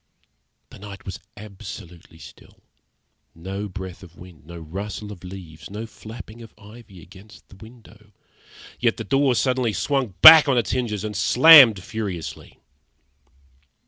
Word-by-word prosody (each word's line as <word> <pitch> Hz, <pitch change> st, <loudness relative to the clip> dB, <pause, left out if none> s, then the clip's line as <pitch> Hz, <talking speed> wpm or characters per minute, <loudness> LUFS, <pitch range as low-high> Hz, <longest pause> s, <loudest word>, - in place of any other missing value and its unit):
The -, -, -14 dB
night 100 Hz, -1 st, -12 dB
was 95 Hz, -, -8 dB, 0.2 s
absolutely 95 Hz, -5 st, -12 dB
still, -, -, -17 dB, 0.7 s
no 95 Hz, +5 st, -7 dB
breath 95 Hz, -1 st, -9 dB
of 90 Hz, -2 st, -16 dB
wind, 85 Hz, -5 st, -16 dB
no 85 Hz, 0 st, -11 dB
rustle 100 Hz, +6 st, -8 dB
of 95 Hz, -4 st, -13 dB
leaves, 85 Hz, -4 st, -12 dB
no 105 Hz, +3 st, -7 dB
flapping 110 Hz, 0 st, -13 dB
of 115 Hz, -, -15 dB
ivy 105 Hz, -4 st, -16 dB
against 95 Hz, +4 st, -18 dB
the -, -, -17 dB
window; 110 Hz, -1 st, -18 dB, 0.7 s
yet -, -, 0 dB
the -, -, -6 dB
door 135 Hz, -2 st, 0 dB
suddenly 125 Hz, -3 st, -1 dB
swung 135 Hz, -8 st, -3 dB
back 160 Hz, -2 st, +10 dB
on 135 Hz, -3 st, +1 dB
its 115 Hz, -, -1 dB
hinges 110 Hz, -6 st, -3 dB
and 105 Hz, -1 st, -6 dB
slammed 125 Hz, -, +6 dB
furiously. 95 Hz, -8 st, -8 dB
105 Hz, 140 wpm, -21 LUFS, 95-115 Hz, 0.7 s, back